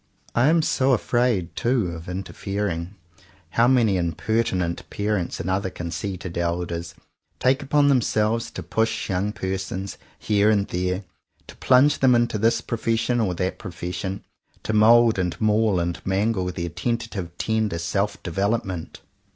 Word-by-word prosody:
I 120 Hz, +3 st, +3 dB
am 165 Hz, +1 st, +4 dB
so 135 Hz, -2 st, +2 dB
afraid, 115 Hz, -8 st, +1 dB
too, 120 Hz, -7 st, +1 dB
of 85 Hz, +1 st, -8 dB
interfering. 95 Hz, -1 st, -4 dB, 0.6 s
How 115 Hz, +5 st, +4 dB
many 115 Hz, -7 st, +3 dB
impertinent 90 Hz, +1 st, -1 dB
parents 105 Hz, -4 st, -2 dB
and -, -, -4 dB
other 95 Hz, +1 st, 0 dB
con 90 Hz, -2 st, -6 dB
ceited 90 Hz, -2 st, -5 dB
elders 85 Hz, 0 st, -2 dB, 0.4 s
take 130 Hz, +2 st, +2 dB
upon 145 Hz, +1 st, +3 dB
themselves 115 Hz, -4 st, +1 dB
to 90 Hz, -, -7 dB
push 110 Hz, +4 st, -1 dB
young 95 Hz, +3 st, 0 dB
persons 95 Hz, -1 st, -4 dB, 0.2 s
here 105 Hz, 0 st, +2 dB
and 100 Hz, -2 st, +2 dB
there; 90 Hz, +2 st, -1 dB, 0.4 s
to -, -, -13 dB
plunge 135 Hz, +3 st, +4 dB
them 130 Hz, -2 st, +5 dB
into 120 Hz, -2 st, +1 dB
this 115 Hz, +2 st, +2 dB
profession 115 Hz, +1 st, 0 dB
or 95 Hz, -6 st, 0 dB
that 90 Hz, +2 st, -2 dB
profession; 95 Hz, +2 st, -5 dB, 0.4 s
to 110 Hz, -, -2 dB
mould 115 Hz, 0 st, +5 dB
and 90 Hz, -1 st, -2 dB
maul 110 Hz, -3 st, +2 dB
and 85 Hz, 0 st, -3 dB
mangle 95 Hz, 0 st, 0 dB
their 85 Hz, -1 st, -3 dB
tenta 115 Hz, +7 st, -2 dB
tive 90 Hz, -6 st, -6 dB
tender 110 Hz, -5 st, 0 dB
self 100 Hz, +5 st, -2 dB
development 95 Hz, -1 st, -2 dB
100 Hz, 145 wpm, -24 LUFS, 90-115 Hz, 0.6 s, them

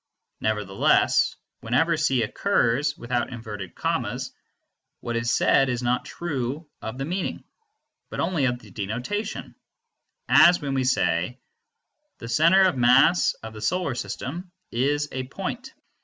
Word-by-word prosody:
Nevertheless, 105 Hz, -3 st, +2 dB, 0.2 s
whenever 160 Hz, +9 st, +1 dB
C 135 Hz, -6 st, +1 dB
occurs 145 Hz, -, +1 dB
without 120 Hz, +1 st, -2 dB
inverted 105 Hz, -5 st, -7 dB
commas, -, -, -2 dB, 0.7 s
what 120 Hz, -, -4 dB
is 115 Hz, 0 st, -1 dB
said 135 Hz, +2 st, +3 dB
is 125 Hz, 0 st, -2 dB
not 125 Hz, +1 st, 0 dB
true 145 Hz, -2 st, -4 dB
of 110 Hz, +3 st, -6 dB
the 135 Hz, -, -3 dB
meaning, 180 Hz, +5 st, -3 dB, 0.7 s
but -, -, -6 dB
only 165 Hz, -5 st, +1 dB
of 125 Hz, -1 st, 0 dB
the 110 Hz, -4 st, -16 dB
denotation, 120 Hz, -, -4 dB, 0.7 s
as 175 Hz, 0 st, +7 dB
when 140 Hz, -3 st, -3 dB
we 130 Hz, -1 st, 0 dB
say: 120 Hz, -4 st, +1 dB, 0.8 s
The 115 Hz, -, -8 dB
center 165 Hz, +11 st, +5 dB
of 185 Hz, -6 st, +3 dB
mass 130 Hz, +8 st, +4 dB
of 110 Hz, 0 st, -7 dB
the 105 Hz, -, -9 dB
Solar 175 Hz, +3 st, 0 dB
System 170 Hz, +8 st, -5 dB, 0.2 s
is 145 Hz, +4 st, 0 dB
a 130 Hz, -1 st, -4 dB
point. 230 Hz, -, -5 dB
130 Hz, 135 wpm, -25 LUFS, 115-165 Hz, 0.8 s, as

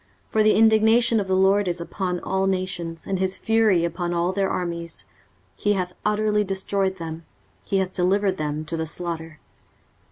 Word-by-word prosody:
23:034:002 -, -, -29 dB
For 220 Hz, -, +3 dB
the 215 Hz, 0 st, +4 dB
indignation 220 Hz, +1 st, +4 dB
of 200 Hz, -, -2 dB
the 190 Hz, -, +1 dB
LORD 195 Hz, +1 st, +3 dB
is 175 Hz, -1 st, -1 dB
upon 180 Hz, +1 st, -3 dB
all 190 Hz, 0 st, 0 dB
nations, 185 Hz, -3 st, -3 dB
and 190 Hz, -1 st, -2 dB
his 190 Hz, 0 st, -1 dB
fury 220 Hz, -6 st, +3 dB
upon 175 Hz, +1 st, -2 dB
all 175 Hz, +2 st, 0 dB
their 195 Hz, 0 st, 0 dB
armies: 170 Hz, -, -4 dB, 0.5 s
he 205 Hz, -, +1 dB
hath 180 Hz, -2 st, -2 dB
utterly 210 Hz, 0 st, +1 dB
destroyed 195 Hz, 0 st, -1 dB
them, 165 Hz, -2 st, -7 dB, 0.4 s
he 195 Hz, -, -1 dB
hath 190 Hz, -1 st, -1 dB
delivered 190 Hz, +1 st, +1 dB
them 150 Hz, 0 st, -3 dB
to 165 Hz, -, -4 dB
the 160 Hz, 0 st, -2 dB
slaughter. 165 Hz, -1 st, -5 dB
185 Hz, 180 wpm, -23 LUFS, 170-200 Hz, 0.5 s, the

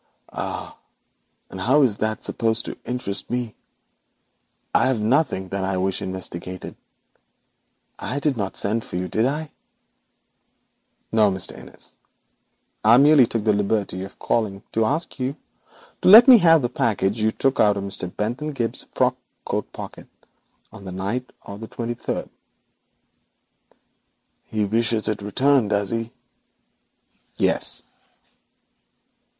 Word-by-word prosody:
'Ah! -, -, -5 dB, 0.8 s
And 95 Hz, -, -7 dB
how 135 Hz, +8 st, +4 dB
is 110 Hz, -6 st, +2 dB
that 110 Hz, 0 st, -2 dB
supposed 115 Hz, 0 st, 0 dB
to -, -, -5 dB
interest 125 Hz, -5 st, -4 dB
me? 120 Hz, -2 st, -2 dB, 1.2 s
There 130 Hz, -, +4 dB
is -, -, -4 dB
nothing 110 Hz, -, +1 dB
that 100 Hz, 0 st, -2 dB
I 95 Hz, 0 st, -1 dB
wish 95 Hz, 0 st, -1 dB
investigated. 95 Hz, -1 st, -5 dB, 1.2 s
I 140 Hz, -, -3 dB
did 145 Hz, -1 st, +1 dB
not 100 Hz, -4 st, -3 dB
send 110 Hz, +3 st, 0 dB
for -, -, -9 dB
you, 90 Hz, +1 st, -2 dB
did 110 Hz, +7 st, +1 dB
I?' 150 Hz, +3 st, -3 dB, 1.6 s
'No, 110 Hz, -2 st, +4 dB
Mr. 95 Hz, -1 st, -2 dB
Innis, -, -, -10 dB, 0.9 s
I 110 Hz, +3 st, +7 dB
merely 140 Hz, -2 st, +6 dB
took 115 Hz, -2 st, -2 dB
the 105 Hz, -1 st, +3 dB
liberty 100 Hz, -2 st, -1 dB
of 95 Hz, -, -10 dB
calling 100 Hz, -4 st, -1 dB
to 115 Hz, 0 st, +1 dB
ask 145 Hz, +7 st, -2 dB
you 130 Hz, +2 st, -2 dB, 0.7 s
to -, -, +4 dB
let 225 Hz, +6 st, +11 dB
me 250 Hz, -3 st, +10 dB
have 165 Hz, -5 st, +5 dB
the -, -, +2 dB
package 110 Hz, -3 st, 0 dB
you 110 Hz, 0 st, +2 dB
took 135 Hz, +4 st, 0 dB
from 100 Hz, -2 st, +2 dB
Mr. 95 Hz, -2 st, -4 dB
Bentham 125 Hz, +11 st, -3 dB
Gibbes's 115 Hz, -3 st, -3 dB
frock -, -, +2 dB, 0.3 s
coat -, -, -3 dB
pocket -, -, -9 dB, 0.7 s
on 100 Hz, -, -11 dB
the 95 Hz, -, -7 dB
night 100 Hz, +8 st, -3 dB
of 100 Hz, 0 st, -9 dB
the 110 Hz, -, -7 dB
twenty 120 Hz, +1 st, -4 dB
third.' -, -, -4 dB, 2.1 s
'He 110 Hz, -1 st, -1 dB
wishes 110 Hz, +1 st, +1 dB
it 105 Hz, -1 st, -1 dB
returned, 125 Hz, +3 st, +2 dB
does 100 Hz, -2 st, 0 dB
he?' 115 Hz, 0 st, -2 dB, 1.3 s
'Yes.' -, -, +2 dB
110 Hz, 135 wpm, -23 LUFS, 100-125 Hz, 2.1 s, let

